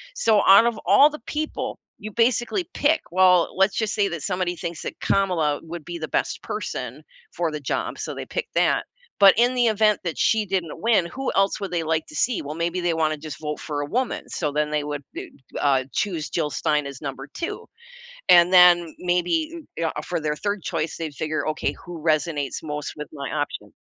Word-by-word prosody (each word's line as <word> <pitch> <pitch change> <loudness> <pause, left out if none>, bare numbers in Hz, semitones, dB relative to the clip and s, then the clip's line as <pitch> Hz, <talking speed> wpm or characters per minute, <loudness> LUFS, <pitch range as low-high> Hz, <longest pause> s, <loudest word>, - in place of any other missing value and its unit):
So, 220 - +3
out 200 +4 +8
of 235 -2 0
all 290 +2 +7
the 300 - -8
people 310 +1 -3 0.2
you 215 - -7
basically 240 - +1
pick, 300 +2 +2
well, 180 -1 +4
let's 195 +1 +3
just 220 -2 0
say 205 -2 +2
that 165 -4 -5
somebody 180 -2 -1
thinks 170 -1 -5
that - - -6
Kamala 170 -7 +1
would 165 -1 -8
be 175 0 -5
the 155 - -4
best - - -1
person - - -5 0.3
for 170 -2 -1
the 150 - -4
job, 130 - -2
so, - - -4
they - - -6
pick - - -4
that, - - +2 0.3
but 195 -1 +9
in 245 +2 +4
the 245 -1 +3
event 215 -1 +3
that 170 -3 -3
she 220 -2 +2
didn't 185 -5 -3
win, 220 -6 +3
who 265 +9 -3
else 195 0 +3
would 195 - -4
they 170 -2 -1
like 160 0 0
to 155 - -12
see? 235 - +1
Well, 145 +1 -6
maybe 170 +2 -1
they 175 -1 +1
wanna 155 -1 +1
just 150 -1 -8
vote 150 -1 -4
for 150 -2 -4
a - - -2
woman, 250 - -2
so 150 -4 -2
then 150 +1 -1
they 150 -1 0
would 145 -1 -5
d - - -7 0.3
uh, 135 -2 +2
choose 170 -7 -2
Jill 155 -3 -1
Stein 150 +2 0
as 140 -2 -9
number 135 -1 -6
2, 335 - -5 0.6
and 175 +1 +7
then 175 -2 +6
maybe 180 - +1
m 325 - -10
yeah, 165 -1 0
uh, - - -2
for 170 +2 -3
their 150 -1 -1
3rd 200 -3 -2
choice, 165 -2 -2
they'd 160 -3 -5
figure, 155 +3 -2
"Okay, 155 - -1
who 175 -2 -10
resonates 155 -2 0
most 150 -1 -4
with 150 -1 -7
my 140 -3 -5
option?" 145 -1 -4
170 Hz, 215 wpm, -23 LUFS, 150-205 Hz, 0.6 s, but